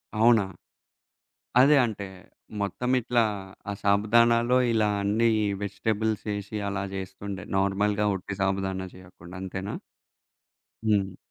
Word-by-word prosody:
అవునా? 110 0 +5 1.2
అదే 145 +3 +6
అంటే, 105 -3 -5 0.6
మొత్తం 115 +5 -2
ఇట్లా 120 0 +2 0.5
ఆ - - -1
సాబుదానాల్లో 115 +4 +4 0.2
ఇలా 110 -2 +2
అన్నీ 105 +4 +2 0.2
ఈ - - +1 0.2
వెజిటబుల్స్ 110 +1 -1
యేసి 100 +1 -4
అలా 100 -1 -2
జేస్తుండే, 95 0 -6
నార్మల్‌గా 100 +2 +1
ఒట్టి 95 +1 -6
సాబుదానా 95 -1 -1
చేయకుండా 90 -1 -13
అంతేనా? 95 +1 -5 1.1
హ్మ్. 100 -3 +1
100 Hz, 105 wpm, -26 LUFS, 95-110 Hz, 1.2 s, అదే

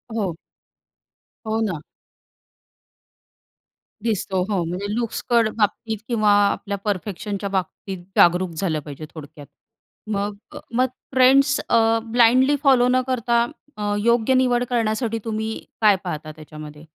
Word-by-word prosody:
हो. 195 -7 -1 1.1
हो, 220 +1 0
ना. 190 -8 -1 2.2
दिसतो. 200 -4 -1
हो. 195 -4 0
म्हणजे 180 +4 -4
लुक्सकडे 235 0 +1
बाबतीत 220 +1 0
किंवा 215 -4 +2 0.2
आपल्या 200 -1 -4
परफेक्शनच्या 200 0 -3
बाबतीत 190 0 -4 0.2
जागरूक 180 +1 +5
झालं 160 -3 -1
पाहिजे 145 +1 -9
थोडक्यात. 150 -2 -11 0.6
मग 205 0 -2 0.2
अ, - - -6
मग 255 +2 +3 0.3
फ्रेंड्स 270 +2 +5
अ, 225 0 +4
ब्लाइंडली 245 +4 +4
फॉलो 260 -3 +5
न 255 +1 +3
करता 235 -2 +1 0.3
अ, 205 -1 -1
योग्य 235 +2 +3
निवड 250 -1 +3
करण्यासाठी 230 -1 0
तुम्ही 220 0 -2 0.3
काय 210 -2 +6
पाहता 155 -4 -5
त्याच्यामध्ये? 155 0 -11
215 Hz, 115 wpm, -22 LUFS, 185-235 Hz, 2.2 s, काय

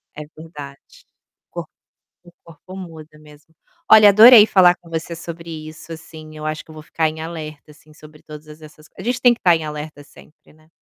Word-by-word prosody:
É 150 - -8
verdade, 150 -3 -12 0.7
o - - -52
corpo - - -8 0.5
o 175 - -18
corpo 170 +3 -15
muda 160 -4 -12
mesmo. 150 +1 -20 0.4
Olha 215 -1 +8
adorei 215 +2 +8
falar 180 -4 +4
com 170 - -20
você 165 +1 -5
sobre 165 0 -10 0.2
isso, 155 +1 -13
assim, 155 -1 -13
eu 155 - -8
acho 155 0 -4
que - - -16
eu - - -13
vou 155 - -11
ficar 160 +1 -2
em 155 0 -9
alerta 155 -2 -9
assim 155 0 -21
sobre 150 0 -18
todas 150 0 -13
essas 155 0 -16
a - - -9
gente 245 +2 -3
tem 245 -1 +5
que 235 - -12
estar 175 -2 +3
em 160 -1 -5
alerta 150 -1 -8
sempre, 150 +2 -21
né. 155 0 -26
155 Hz, 205 wpm, -19 LUFS, 155-170 Hz, 0.7 s, Olha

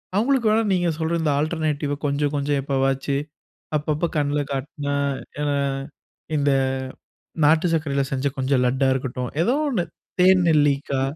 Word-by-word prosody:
அவங்களுக்கு 235 +1 +2
வேணா 220 +1 +3
நீங்க 175 -2 +1
சொல்ற 160 +1 -1
இந்த 155 -2 +1
ஆல்டர்நேட்டிவ்‌வ 155 -2 -1
கொஞ்சம் 145 +1 0
கொஞ்சம் 145 0 0
எப்பவாச்சு, 135 0 0 0.6
அப்பப்ப 155 +3 -1
கண்ல 145 0 +1
காட்டுனா, 145 +1 -3 0.5
ஏனா 145 -1 0 0.8
இந்த 145 0 +2 0.9
நாட்டு 160 +3 +4
சர்க்கரையில 140 -4 0
செஞ்ச 135 0 -2
கொஞ்சம் 130 -1 +1
லட்டா 130 +2 +2
இருக்கட்டும். 125 -1 -3
ஏதோ 240 +8 +2
ஒன்னு 200 -10 0 0.4
தேன் 185 0 +6
நெல்லிக்கா. 145 -3 +2
145 Hz, 130 wpm, -23 LUFS, 140-160 Hz, 0.9 s, தேன்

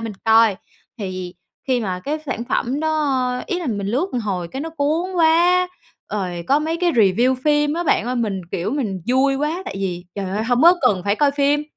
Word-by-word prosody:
mình 225 -1 -5
coi. 225 -3 +5 0.4
Thì 185 -3 -5 0.3
khi 255 -2 +1
mà 185 -4 -3
cái 295 +9 -3
sản 240 -4 -3
phẩm 255 +3 -1
đó 275 -5 0
ý 360 - -2
là 350 - -5
mình 200 -5 -2
lướt 260 - 0
một 250 - -1
hồi 185 -5 -3
cái 265 +10 -6
nó 325 - -5
cuốn 320 +4 -1
quá, 345 +2 +4 0.4
rồi 180 -4 -3
có 280 - +4
mấy 320 +2 -2
cái 350 0 +1
review 230 +3 +3
phim 295 -1 +3
á 345 - -1
bạn 240 -6 +2
ơi, 250 - -1
mình, 210 -5 -1
kiểu, 175 +4 -2
mình 225 -9 -2
vui 265 +2 +3
quá, 305 +6 -2
tại - - -6
vì, 180 -2 -3
trời 195 -2 -4
ơi, 210 +3 -1
hông 245 +2 +1
có 345 +2 +8
cần 185 -3 +2
phải 200 +1 +1
coi 290 +2 +3
phim, 285 +1 +1
255 Hz, 220 wpm, -20 LUFS, 205-300 Hz, 0.4 s, có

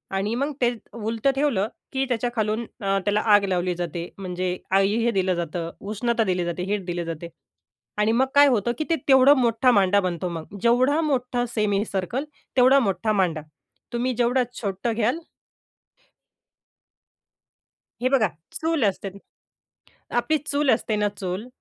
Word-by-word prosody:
आणि 200 +3 -1
मग 280 +4 -1
ते 240 - +4
त 225 - -20
उलट 225 +4 0
ठेवलं, 270 -8 +1 0.3
की 270 0 0
त्याच्याखालून 230 -2 -1 0.2
अ, 195 0 +1
त्याला 210 +1 +2
आग 205 - +4
लावली 180 -1 0
जाते. 170 0 -4
म्हणजे 180 -1 -3 0.2
आई 195 +2 +2
हे 235 - +2
दिलं 190 -3 +1
जातं, 170 0 -4
उष्णता 225 +3 -1
दिली 180 -3 0
जाते, 175 +1 -3
हीट 195 -1 -2
दिली 175 -1 -3
जाते. 165 +1 -6 0.7
आणि 210 +1 +2
मग 260 +3 +2
काय 285 0 +8
होतं, 240 -3 +1
की - - -1
ते 330 - +3
तेवढा 265 +1 +7
मोठा 245 -1 +3
मांडा 200 -1 +4
बनतो. 180 -1 -2
मग 170 +4 -7
जेवढा 255 +7 +3
मोठा 250 -4 0
सेमी 205 -2 +1
सर्कल 200 - -2 0.3
तेवढा 260 +2 +6
मोठा 215 -1 0
मांडा. 175 -6 +1 0.5
तुम्ही 250 +2 0
जेवढं 245 +2 +2 0.2
छोटं 205 +2 -2
घ्याल 235 +8 +1 2.8
हे 255 - +2
बघा 255 -6 +3 0.2
चूल 320 -6 0
असते 195 0 -1
न 200 - -13 1.0
आपली 310 +6 +2
चूल 285 -1 0
असते 220 -1 +1
ना 210 0 +1
चूल, 190 +5 -4
215 Hz, 155 wpm, -24 LUFS, 190-250 Hz, 2.8 s, काय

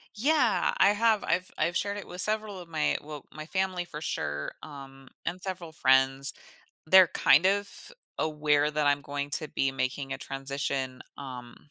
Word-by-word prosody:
Yeah, 255 +1 +2
I 195 - +6
have, 220 0 +2
I've 185 +1 0
I've 170 0 0
shared 200 0 -1
it - - -8
with 180 +1 -5
several 215 -2 0
of 175 - -10
my 160 -2 0
well, 150 -1 -9
my 155 0 -8
family 190 -1 -1
for 150 -3 -8
sure, 75 - -3
um, 135 -2 -11 0.2
and 175 +2 -3
several 180 -3 -6
friends, 135 -1 +3 0.5
they're 185 0 +8
kind 160 +7 +4
of 200 +1 -1 0.3
aware 150 -1 +2
that 150 -1 0
I'm 145 0 +3
going 145 0 -4
to 155 - -7
be 135 0 0
making 135 +1 -3
a - - -4
transition, 135 -1 -3 0.2
um, 125 -3 -9
155 Hz, 170 wpm, -28 LUFS, 135-185 Hz, 0.5 s, they're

